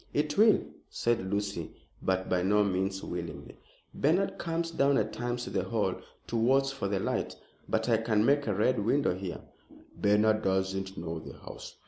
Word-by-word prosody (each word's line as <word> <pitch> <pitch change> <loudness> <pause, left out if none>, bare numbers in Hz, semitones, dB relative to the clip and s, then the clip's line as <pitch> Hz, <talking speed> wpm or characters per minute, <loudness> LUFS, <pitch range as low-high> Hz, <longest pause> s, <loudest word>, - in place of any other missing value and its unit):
"It 150 0 +1
will," 215 0 +5 0.3
said 110 -5 0
Lucy, 100 -5 -2 0.3
but 95 0 0
by 90 -1 +1
no 105 +3 +3
means 95 0 -1
willingly. 85 -1 -6 0.3
"Bernard 175 +7 +1
comes 165 0 -2
down 140 -3 +3
at 110 0 0
times 120 0 -2
to - - -6
the - - 0
Hall - - 0 0.3
to - - -5
watch 135 +4 +3
for 135 -7 -3
the 100 -1 0
light. - - -2 0.3
But 110 +1 0
I 115 -2 +4
can 110 -1 +2
make 140 +1 +3
a 105 - +1
Red 110 +2 +2
Window 135 0 +2
here." 90 -1 -5 0.5
"Bernard 105 +1 +3
doesn't 95 0 -1
know 80 -1 -4
the - - -10
house." - - -10
110 Hz, 175 wpm, -30 LUFS, 95-135 Hz, 0.5 s, will